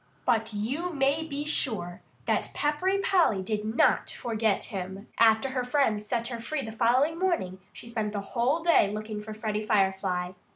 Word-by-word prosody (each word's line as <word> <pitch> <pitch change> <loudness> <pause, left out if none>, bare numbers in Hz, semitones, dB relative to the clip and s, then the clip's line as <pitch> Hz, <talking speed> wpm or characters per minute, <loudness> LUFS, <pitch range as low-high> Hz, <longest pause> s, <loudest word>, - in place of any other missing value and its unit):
But 225 -2 +1
you 260 +13 -2
may 280 0 +1
be 295 -2 -4
sure 215 - -2 0.2
that - - 0
Peppery 300 +7 +1
Polly 335 - +3
did 210 +2 -2
not 220 +3 +2
forget 220 -3 0
him. 195 0 -6
After 225 +3 +5
her 255 -1 -1
friends 245 -5 +1
set 235 0 -1
her 235 -2 -5
free 275 +4 -3
the 220 - -6
following 255 +8 +2
morning 330 - 0
she - - -10
spent 220 -3 -2
the 205 - -3
whole 260 +7 +1
day 335 -12 +5
looking 215 0 -5
for 215 0 -8
Freddie 215 -1 -2
Firefly. 190 -3 +1
225 Hz, 170 wpm, -28 LUFS, 210-280 Hz, 0.2 s, After